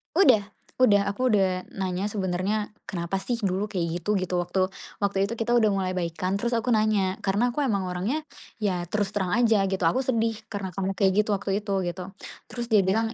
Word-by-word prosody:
Udah 250 Hz, -, +5 dB, 0.4 s
udah, 205 Hz, -5 st, +5 dB
aku 250 Hz, +6 st, 0 dB
udah 190 Hz, -4 st, +1 dB
nanya 190 Hz, +1 st, -2 dB
sebenernya, 200 Hz, +2 st, -1 dB, 0.2 s
"Kenapa 170 Hz, 0 st, -3 dB
sih 240 Hz, +4 st, -2 dB
dulu 195 Hz, 0 st, -1 dB
kayak 175 Hz, -2 st, -2 dB
gitu?" 210 Hz, +4 st, +1 dB
gitu. 180 Hz, -1 st, 0 dB
Waktu 185 Hz, +1 st, 0 dB, 0.3 s
waktu 200 Hz, -1 st, 0 dB
itu -, -, -2 dB
kita 235 Hz, +2 st, 0 dB
udah 225 Hz, -3 st, +5 dB
mulai 190 Hz, -2 st, 0 dB
baikan, 180 Hz, +1 st, -2 dB
terus 235 Hz, +4 st, -1 dB
aku 235 Hz, +2 st, +1 dB
nanya 215 Hz, -3 st, +2 dB
karena 220 Hz, +5 st, +1 dB
aku 295 Hz, -, -1 dB
emang 200 Hz, -9 st, +1 dB
orangnya 200 Hz, +13 st, -2 dB, 0.3 s
ya 190 Hz, -5 st, 0 dB
terus 205 Hz, 0 st, -1 dB
terang 190 Hz, -3 st, -1 dB
aja 225 Hz, -4 st, +4 dB
gitu, 190 Hz, -1 st, -2 dB
"Aku 210 Hz, +11 st, +3 dB
sedih 230 Hz, -3 st, +1 dB, 0.2 s
karena 200 Hz, -3 st, -4 dB
kamu 195 Hz, +1 st, -2 dB
kayak 190 Hz, -1 st, +3 dB
gitu 215 Hz, -, -10 dB
waktu 200 Hz, 0 st, -1 dB
itu," 205 Hz, -1 st, -3 dB
gitu. 180 Hz, +2 st, -5 dB, 0.4 s
Terus 240 Hz, -1 st, -4 dB
dia 210 Hz, -, +7 dB
bilang, 220 Hz, +4 st, +1 dB
200 Hz, 195 wpm, -26 LUFS, 185-220 Hz, 0.4 s, dia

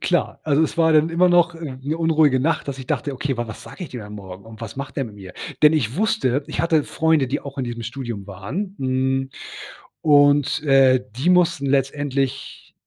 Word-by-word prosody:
Klar, -, -, -1 dB
also, 155 Hz, 0 st, +3 dB
es 160 Hz, -, -2 dB
war 160 Hz, -1 st, +4 dB
dann 155 Hz, +1 st, +4 dB
immer 180 Hz, +2 st, +3 dB
noch 175 Hz, -1 st, +4 dB
'ne 145 Hz, -1 st, -5 dB
unruhige 155 Hz, -5 st, +3 dB
Nacht, 160 Hz, 0 st, 0 dB
dass 135 Hz, -1 st, -4 dB
ich 130 Hz, -, -8 dB
dachte: 145 Hz, -, -2 dB
„Okay, 135 Hz, 0 st, -3 dB
wa 120 Hz, -1 st, -3 dB
was 110 Hz, -, -9 dB
sage 180 Hz, -, -9 dB
ich 145 Hz, -, -11 dB
dem 125 Hz, -, -6 dB
dann 105 Hz, 0 st, -9 dB
Morgen 95 Hz, -2 st, -10 dB
und 110 Hz, 0 st, -13 dB
was 115 Hz, +1 st, -7 dB
macht 135 Hz, 0 st, -6 dB
der 135 Hz, -, 0 dB
mit 110 Hz, -, -10 dB
mir?“ 95 Hz, -3 st, -11 dB, 0.3 s
Denn 150 Hz, +1 st, +7 dB
ich 130 Hz, -3 st, 0 dB
wusste, 185 Hz, -, +1 dB
ich 150 Hz, -, -3 dB
hatte 160 Hz, -3 st, +2 dB
Freunde, 160 Hz, -4 st, +1 dB
die 135 Hz, +4 st, -2 dB
auch 140 Hz, 0 st, -9 dB
in 130 Hz, -, -1 dB
diesem 120 Hz, -1 st, -5 dB
Studium 120 Hz, -4 st, -6 dB
waren. 130 Hz, -, -5 dB
N 130 Hz, 0 st, 0 dB, 0.7 s
und, 145 Hz, 0 st, +4 dB
äh, 135 Hz, -3 st, +4 dB
die 160 Hz, +7 st, +1 dB
mussten 170 Hz, -5 st, +3 dB
letztendlich 135 Hz, 0 st, -2 dB
140 Hz, 210 wpm, -22 LUFS, 125-160 Hz, 0.7 s, Denn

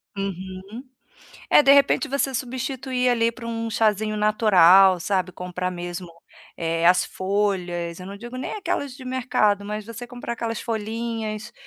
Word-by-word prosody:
Uhum. 195 Hz, +3 st, -6 dB, 0.7 s
Eh, -, -, +7 dB
de 275 Hz, -, +6 dB
repente 280 Hz, +2 st, +4 dB
você 275 Hz, 0 st, -1 dB
substituir, 255 Hz, 0 st, -2 dB
ali, 230 Hz, -1 st, +2 dB
por 235 Hz, +1 st, -12 dB
um 230 Hz, 0 st, -3 dB
chazinho 215 Hz, -1 st, +1 dB
natural, 195 Hz, -3 st, +6 dB
sabe, 185 Hz, +1 st, -1 dB
comprar 180 Hz, 0 st, -4 dB
mesmo, 175 Hz, 0 st, -6 dB, 0.5 s
eh, 165 Hz, 0 st, -1 dB
as 180 Hz, +1 st, +5 dB
folhas, 185 Hz, -3 st, -2 dB
eu 180 Hz, -, -8 dB
não 200 Hz, +1 st, -8 dB
digo 240 Hz, +4 st, -9 dB
nem 255 Hz, -, -4 dB
aquelas 285 Hz, -9 st, -3 dB
de 265 Hz, -, -11 dB
mercado, 250 Hz, -6 st, +1 dB
mas 210 Hz, +1 st, -5 dB
você 230 Hz, +1 st, -8 dB
comprar 245 Hz, -1 st, -6 dB
aquelas 230 Hz, -2 st, -3 dB
folhinhas, 225 Hz, 0 st, -4 dB
215 Hz, 150 wpm, -23 LUFS, 185-240 Hz, 0.7 s, Eh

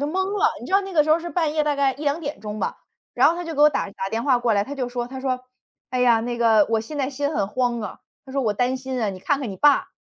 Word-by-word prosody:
就 285 Hz, -, 0 dB
蒙 380 Hz, +5 st, -1 dB
了， 415 Hz, -, +2 dB
你 -, -, -8 dB
知 -, -, -8 dB
道 395 Hz, -, +5 dB
那 390 Hz, -1 st, -7 dB
个 310 Hz, -, +5 dB
时 310 Hz, -, -1 dB
候 315 Hz, -, +5 dB
是 345 Hz, +1 st, -6 dB
半 330 Hz, -4 st, 0 dB
夜 305 Hz, -1 st, +1 dB
大 295 Hz, -1 st, +1 dB
概 275 Hz, -1 st, +2 dB
1:00-2:00 285 Hz, -, -3 dB
吧， -, -, -2 dB, 0.4 s
然 -, -, +5 dB
后 335 Hz, -, +1 dB
她 350 Hz, -, -5 dB
就 330 Hz, -1 st, -5 dB
给 290 Hz, -, -1 dB
我 300 Hz, -, +8 dB
打 285 Hz, -, -2 dB
打 195 Hz, -1 st, -4 dB
电 225 Hz, +3 st, -2 dB
话 260 Hz, -3 st, +3 dB
过 240 Hz, -2 st, +1 dB
来， 200 Hz, -, +2 dB
她 285 Hz, -, -6 dB
就 255 Hz, -3 st, -3 dB
说 240 Hz, -1 st, -3 dB
她 265 Hz, 0 st, -7 dB
说： 255 Hz, -1 st, -1 dB, 0.5 s
“哎 255 Hz, 0 st, -1 dB
呀， 235 Hz, -2 st, +4 dB
那 240 Hz, +1 st, -3 dB
个 220 Hz, -3 st, +4 dB
我 225 Hz, -1 st, +2 dB
现 295 Hz, +7 st, -8 dB
在 275 Hz, 0 st, -1 dB
心 285 Hz, +2 st, -2 dB
很 200 Hz, -, 0 dB
慌 240 Hz, -1 st, -1 dB
啊“， 210 Hz, -, -6 dB, 0.3 s
她 265 Hz, -, -11 dB
说：” 275 Hz, -, 0 dB
我 215 Hz, -3 st, +1 dB
担 250 Hz, +4 st, 0 dB
心 260 Hz, -1 st, -4 dB
啊， 215 Hz, -, +1 dB
你 185 Hz, -, -8 dB
看 275 Hz, +9 st, 0 dB
看 255 Hz, -6 st, -4 dB
你 190 Hz, -, -7 dB
爸， 290 Hz, +5 st, +4 dB
265 Hz, 330 characters per minute, -23 LUFS, 235-295 Hz, 0.5 s, 我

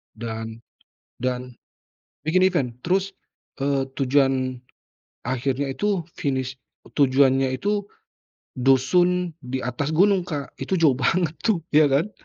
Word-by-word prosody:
Dan 110 Hz, 0 st, -5 dB, 0.6 s
dan 125 Hz, 0 st, -3 dB, 0.7 s
bikin 185 Hz, +4 st, +4 dB
event. 170 Hz, -9 st, +2 dB, 0.2 s
Terus, 190 Hz, +2 st, 0 dB, 0.5 s
eee, 135 Hz, -1 st, 0 dB
tujuan 135 Hz, -2 st, +1 dB, 0.7 s
akhirnya 135 Hz, +2 st, -1 dB
itu 200 Hz, 0 st, -1 dB
finish 130 Hz, -2 st, -2 dB, 0.4 s
tujuannya 135 Hz, -1 st, +4 dB
itu, 205 Hz, +4 st, 0 dB, 0.8 s
dusun 175 Hz, +8 st, +3 dB
di 130 Hz, +1 st, -4 dB
atas 140 Hz, +5 st, -2 dB
gunung, 190 Hz, 0 st, +3 dB
Kak. 145 Hz, -4 st, -4 dB
Itu 190 Hz, -, -1 dB
jauh 155 Hz, -7 st, +3 dB
banget 165 Hz, +4 st, +1 dB
tuh, 205 Hz, -8 st, 0 dB
ya 150 Hz, 0 st, +6 dB
kan? 145 Hz, +9 st, +1 dB
140 Hz, 115 wpm, -23 LUFS, 130-175 Hz, 0.8 s, ya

